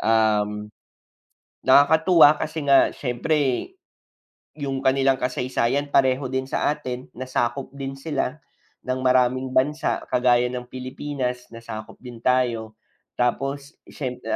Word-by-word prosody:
Um, 105 -1 +1 0.9
nakakatuwa 160 +3 +6
kasi 155 -1 -4
nga 140 -1 +5
syempre 135 - -1 0.9
'yong 135 -2 -2
kanilang 135 0 +3
kasaysayan 125 +2 -1
pareho 130 -1 +2
din 130 0 -2
sa - - -1
atin, 125 -3 -6
nasakop 130 +1 -2
din 135 -1 -5
sila 140 0 -3 0.5
ng 130 0 -2
maraming 130 0 +2
bansa 145 +4 0
kagaya 125 -1 +3
ng 125 0 -6
Pilipinas, 130 -1 -5
nasakop 110 -2 -9
din 120 -2 -11
tayo. 115 -4 0 0.4
Tapos 135 +4 -1 0.2
syemp 125 -3 -5
130 Hz, 110 wpm, -23 LUFS, 125-140 Hz, 0.9 s, nakakatuwa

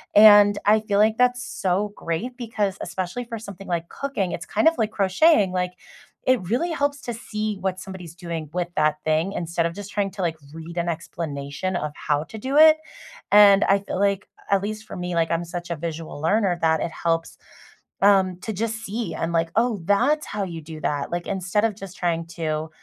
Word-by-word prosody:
And 205 -1 +8
I 215 +1 +5
feel 205 -2 0
like 215 +1 +4
that's 250 0 +2
so 195 +2 -1
great 230 +10 -3
because 210 -5 -2
especially 185 +7 -4
for 230 -1 -6
something 200 -2 -10
like 170 -1 -2
cooking, 240 -11 -3
it's 170 - -5
kind 320 - +2
of 330 - -8
like 220 -2 0
crocheting, 200 - +3
like, 180 0 -1 0.5
it 255 -4 +3
really 335 +9 0
helps 285 -2 -1
to 240 -1 -4
see 215 -2 -3
what 190 -1 -2
somebody's 175 -2 -9
doing 170 -4 -5
with 175 0 -2
that 155 0 +3
thing 160 +5 +1
instead 170 0 -1
of 170 - -7
just 205 0 -8
trying 200 -1 0
to, 195 0 -7
like, 165 -2 0 0.2
read 165 +1 -9
an 170 0 0
explanation 160 +1 -4
of 150 -3 -2
how 150 0 -1
to 220 +6 -10
do 270 +5 -1
it. 315 0 +8 0.5
And 205 -1 +8
I 195 - +4
feel 195 -1 -5
like, 200 0 +1 0.2
a - - +6
at 195 - 0
least 215 +1 -4
for - - -8
me, 180 0 -4
like 165 -1 +2
I'm 170 +1 0
such 175 0 -6
a 170 - -1
visual 160 -1 -6
learner, 190 +1 +2
that 160 -1 +3
it - - -1
helps, 165 0 -2 0.6
um, 190 -3 +4
to 220 - -4
just 220 +2 -2
see 220 +3 -3
and 165 +1 -2
like, 165 0 +1
"Oh, 225 -4 +1
that's 250 +10 +2
how 210 - -4
you 170 -3 -5
do 155 0 -9
that." 145 +1 -2
Like, 175 0 -3
instead 195 +1 0
of 215 - -1
just 195 -2 -9
trying 165 -1 -1
to 155 -1 -2
190 Hz, 210 wpm, -23 LUFS, 170-215 Hz, 0.6 s, And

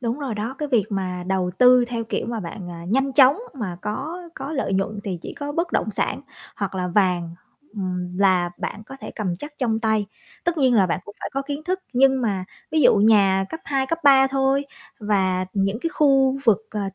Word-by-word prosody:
Đúng 240 +2 -2
rồi 270 -7 -3
đó, 220 +5 -4
cái 300 - -3
việc 235 -7 +3
mà 185 -3 -3
đầu 185 -1 0
tư 250 0 +7
theo 235 -2 -3
kiểu 225 - -3
mà 230 -1 -3
bạn, 175 0 -7
à, 170 0 -8
nhanh 270 +5 +1
chóng 275 +6 +6 0.2
mà 205 -10 -4
có 300 +12 -4
có 285 +3 -6
lợi 275 -8 -1
nhuận 195 +2 -1
thì 185 -3 -3
chỉ - - -7
có 290 0 -5
bất 335 +1 -2
động - - 0
sản, 200 - -1 0.4
hoặc 195 -1 -3
là 180 -1 -2
vàng, 175 -3 +1 0.4
ừm, 180 -2 -4
là 185 -3 +3
bạn 215 - -5
có 270 - -9
thể - - -7
cầm 185 -5 -2
chắc 295 - -7
trong 225 -4 0
tay. 220 -2 +1 0.4
Tất 345 -1 0
nhiên 260 -4 +4
là 195 -4 +5
bạn 180 +1 -1
cũng 205 - -11
phải - - -4
có 275 0 -1
kiến 285 +1 -5
thức, 370 +2 -1
nhưng 265 +1 +4
mà 195 -5 -1 0.3
ví 315 - +2
dụ 245 - +6
nhà 200 -2 +4
cấp 325 - -7
2, 275 -1 0
cấp 330 +4 -1
3 270 -1 +7
thôi 270 +1 +1 0.4
và 190 -3 +1
những 195 +2 0
cái 330 - -2
khu 270 -3 +3
vực, 220 -1 +3
ờ, 210 - -3
220 Hz, 225 wpm, -23 LUFS, 190-270 Hz, 0.4 s, tư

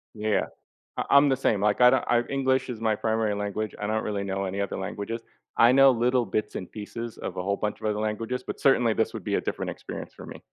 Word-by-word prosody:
Yeah. 105 0 0 0.5
I - - -1
I'm 140 0 +6
the 135 - +2
same, 110 -6 +1
like, 105 +2 +2
I 125 - +9
don't - - +2
I 120 -1 +3
English 130 -1 +1
is 115 -3 -6
my 110 -1 +2
primary 110 -1 0
language, 105 +1 -3
I 105 - -2
don't 110 0 0
really 100 -2 -2
know 95 0 -2
any 95 +2 -3
other 100 - -3
languages- 100 +4 -4 0.4
I 120 +2 +7
know 135 +1 +7
little 125 0 +2
bits 110 - -2
and 90 - -6
pieces 115 +2 -7
of 95 - -6
a - - -1
whole 100 +2 0
bunch 105 -1 -3
of 110 - -2
other 105 0 -1
languages, 110 +3 -2
but - - -6
certainly, 120 -5 +4
this 110 - 0
would - - -6
be - - -1
a - - 0
different - - -3
experience - - -8
for - - -11
me. - - -9
110 Hz, 250 wpm, -26 LUFS, 105-125 Hz, 0.5 s, I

